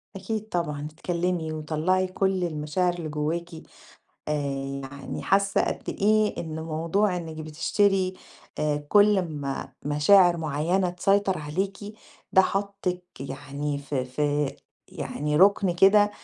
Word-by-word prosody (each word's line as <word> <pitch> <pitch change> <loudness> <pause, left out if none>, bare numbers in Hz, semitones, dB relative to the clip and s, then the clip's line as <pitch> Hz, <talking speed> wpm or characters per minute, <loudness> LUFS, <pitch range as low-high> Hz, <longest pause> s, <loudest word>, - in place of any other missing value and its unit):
أكيد 215 +3 -4
طبعًا، 150 -5 -2
اتكلِّمي 170 -1 -2
وطلّعي 160 +5 0
كل 190 0 0
المشاعر 170 +2 0
اللي 170 -3 -5
جوّاكِ. 155 +3 -2 0.8
آآ - - 0 0.5
يعني 135 0 -7
حاسّة 195 +1 +2
قد - - -4
إيه 215 +1 +2
إن 160 -1 -5
موضوع 165 +5 0
إنِّك 165 -2 -6
بتشتري 185 +5 +1 0.4
آآ 150 -1 +1
كل 205 +1 +5
أمّا 145 -6 -4
مشاعر 170 +5 +5
معيّنة 165 +4 0
تسيطر 195 +2 +1
عليكِ 190 +7 -3 0.5
ده 190 - +7
حاطِّك 195 -2 -2 0.2
يعني 140 +2 -4
في 140 -2 -3
في 145 +2 -1 0.4
يعني 150 +1 -3
رُكن 195 +1 +5
كده 200 +3 +5
170 Hz, 120 wpm, -26 LUFS, 150-195 Hz, 0.8 s, ده